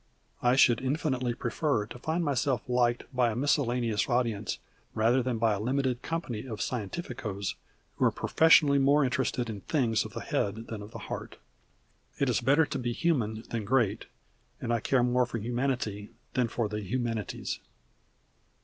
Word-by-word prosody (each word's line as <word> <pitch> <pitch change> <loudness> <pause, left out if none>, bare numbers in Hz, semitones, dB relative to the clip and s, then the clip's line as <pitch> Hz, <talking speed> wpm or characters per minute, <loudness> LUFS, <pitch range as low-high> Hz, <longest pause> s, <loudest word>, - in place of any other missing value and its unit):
I 125 +1 +4
should 120 -3 +5
infinitely 130 -3 -1
prefer 140 -5 0
to 125 +3 -10
find 160 +5 -1
myself 135 -2 +1
liked 120 -1 +2
by 125 -1 +3
a 110 - -3
miscellaneous 120 -5 +1
audience 115 -5 0 0.4
rather 115 +4 +3
than 125 -1 -1
by 110 -1 +3
a 100 - -2
limited 130 +2 0
company 135 -8 -4
of 110 -4 -6
scientificos 110 - -3 0.4
who - - +3
are - - +4
professionally 150 -3 +5
more 140 +2 +4
interested 125 -2 0
in 105 -3 -6
things 115 -6 +1
of - - -9
the - - -5
head 110 +3 -2
than 110 -2 -5
of 105 - -9
the - - -8
heart. - - -6 0.8
It - - +1
is - - +1
better 145 +4 +4
to 140 - -4
be 120 -1 -2
human 115 -9 0
than 115 -2 -2
great, 110 -2 +1 0.5
and 120 - -1
I 115 - +2
care 125 +3 +2
more 125 0 +2
for 120 - -4
Humanity 120 -3 -2 0.2
than 125 -2 +2
for 115 -1 -1
the 105 0 -4
Humanities. 115 0 -3
120 Hz, 165 wpm, -29 LUFS, 110-135 Hz, 0.8 s, should